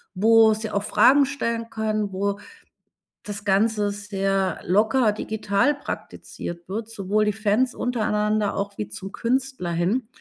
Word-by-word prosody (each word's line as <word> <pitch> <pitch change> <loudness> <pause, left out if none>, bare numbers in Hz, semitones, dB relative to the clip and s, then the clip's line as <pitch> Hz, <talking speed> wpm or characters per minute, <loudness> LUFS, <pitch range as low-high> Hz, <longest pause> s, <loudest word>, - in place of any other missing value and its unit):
wo 220 +2 +5
sie 220 0 -4
auch 200 -1 -1
Fragen 275 +6 +5
stellen 230 -4 -3
können, 215 -2 -2
wo 200 +1 -1 0.8
das 205 0 -6
Ganze 205 +1 +2
sehr 195 -2 -1
locker 220 +5 +3
digital 215 +4 0
praktiziert 175 -10 -7
wird, 220 +3 -4
sowohl 210 0 0
die 210 - +1
Fans 220 +4 +1
untereinander 210 -3 0
auch 200 0 -4
wie 105 0 -4
zum 190 - -7
Künstler 255 -6 -2
hin. 185 +9 0
210 Hz, 135 wpm, -24 LUFS, 200-225 Hz, 0.8 s, wo